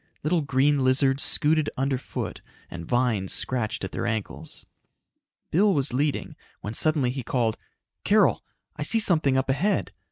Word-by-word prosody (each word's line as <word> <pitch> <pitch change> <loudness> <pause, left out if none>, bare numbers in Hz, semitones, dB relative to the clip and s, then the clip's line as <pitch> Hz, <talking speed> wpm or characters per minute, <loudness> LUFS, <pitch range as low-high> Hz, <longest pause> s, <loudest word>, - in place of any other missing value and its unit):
Little 165 +3 +1
green 140 0 +2
lizards 135 +1 +3
scooted 155 -1 +2
underfoot 135 0 -3 0.3
and 85 -1 -7
vines 120 -6 0
scratched 120 -6 -1
at 95 - -4
their 120 - -3
ankles. 110 -3 -4 0.9
Bill 195 +3 +3
was 140 -3 +1
leading, 145 +3 -1 0.3
when 105 - -5
suddenly 145 -1 +1
he 130 +1 -4
called, 115 -2 0 0.5
"Carol, - - +3 0.3
I 150 - -8
see 185 +10 +2
something 155 -10 +2
up 130 - 0
ahead! 155 +10 0
135 Hz, 140 wpm, -25 LUFS, 125-150 Hz, 0.9 s, lizards